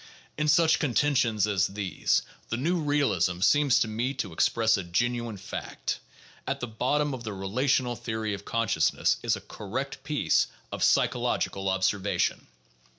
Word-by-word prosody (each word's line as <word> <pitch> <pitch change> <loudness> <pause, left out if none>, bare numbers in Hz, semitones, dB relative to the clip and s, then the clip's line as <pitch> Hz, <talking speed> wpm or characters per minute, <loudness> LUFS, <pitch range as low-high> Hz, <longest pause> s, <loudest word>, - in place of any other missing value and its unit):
In 150 0 -1
such 160 +1 +4
con 130 -6 -1
tentions 125 -8 +2
as 100 -4 +1
these 100 -2 0 0.3
the 115 - -1
new 170 +8 0
realism 140 - +1
seems 145 +5 +4
to - - +2
me 120 +5 -2
to 105 -10 -4
express 115 +6 +3
a 95 - -3
genuine 120 +5 -1
fact; 100 - -5 0.5
at - - -1
the - - -2
bottom 135 +6 0
of 125 -2 -6
the 110 -2 -4
relational 120 +6 0
theory 110 -2 -3
of 100 0 -6
consciousness 115 0 +1
is 115 -2 +1
a 100 - -8
correct 130 +7 -6
piece 150 0 +2 0.2
of - - -3
psychological 95 0 +1
observation. 95 +1 0
115 Hz, 150 wpm, -27 LUFS, 100-135 Hz, 0.5 s, such